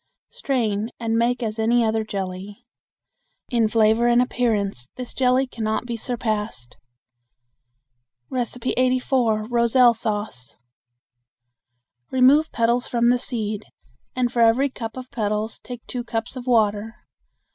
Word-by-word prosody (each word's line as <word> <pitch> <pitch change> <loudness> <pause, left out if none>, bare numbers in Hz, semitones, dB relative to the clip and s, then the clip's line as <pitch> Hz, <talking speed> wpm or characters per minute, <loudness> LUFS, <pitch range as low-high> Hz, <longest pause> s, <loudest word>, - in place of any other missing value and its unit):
Strain 225 -5 -1
and 225 -1 -1
make 240 +2 +1
as 220 0 -3
any 230 +1 +3
other 220 0 0
jelly. 195 -1 -6 0.8
In 230 -3 +2
flavor 220 +1 +3
and 240 0 +4
appearance 210 - 0
this 250 -1 -7
jelly 255 0 +2
can 240 -3 -7
not 220 +2 -1
be 240 -1 -4
surpassed. 215 - -3 1.6
84. 250 -2 0
Roselle 240 +1 +4
Sauce. 210 - -4 1.5
Remove 270 +5 +4
petals 235 +2 +1
from 235 0 +2
the 245 0 +3
seed, 215 -4 -4 0.5
and 250 -2 0
for 235 - +1
every 245 +5 +4
cup 225 -1 -7
of 255 0 -8
petals 215 -1 -2
take 245 -2 -9
two 245 -1 -4
cups 235 +1 -4
of 255 0 -8
water. 220 -1 +1
230 Hz, 125 wpm, -23 LUFS, 215-245 Hz, 1.6 s, and